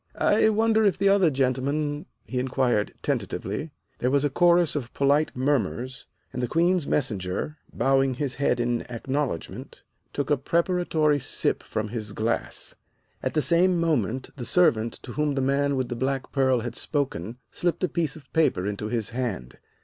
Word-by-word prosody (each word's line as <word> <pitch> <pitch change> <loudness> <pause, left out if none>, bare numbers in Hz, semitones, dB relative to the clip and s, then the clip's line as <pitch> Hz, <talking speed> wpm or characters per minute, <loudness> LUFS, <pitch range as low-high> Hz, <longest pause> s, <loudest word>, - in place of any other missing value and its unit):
"I 220 +1 +3
wonder 220 0 +3
if 200 -3 +3
the 200 +1 +3
other 195 -4 +5
gentlemen 140 +2 -1
" - - -46
he 125 - -3
inquired 125 -4 +1
tentatively. 105 +11 -2 0.3
There 125 - +1
was 140 +2 +2
a 145 - 0
chorus 175 +1 +4
of 125 -5 -3
polite 145 +2 +2
murmurs, 130 -1 -1 0.3
and 125 - -3
the 125 - 0
Queen's 170 +2 +2
Messenger, 105 +4 -2
bowing 135 -1 +2
his 135 -1 -2
head 125 -3 +2
in 120 0 0
acknowledgment, 130 - -4 0.3
took 145 +1 -2
a 145 - +4
preparatory 165 -1 +1
sip - - 0
from 110 0 -3
his 105 -2 -5
glass. 110 +3 -2 0.5
At - - -3
the 155 - +3
same 175 +1 +4
moment 130 - 0
the 125 - -5
servant 115 -8 +3
to 125 - -7
whom 150 +1 0
the - - 0
man 140 +1 +1
with 130 -2 -1
the 120 - -3
black 135 +2 -2
pearl 130 -3 +2
had 120 +1 -4
spoken, 125 - -2
slipped 175 +1 -1
a - - +4
piece 160 -2 -1
of 150 -4 -15
paper 155 - +2
into 105 +1 -3
his 115 -1 -2
hand. 115 - -4
135 Hz, 170 wpm, -26 LUFS, 120-155 Hz, 0.5 s, other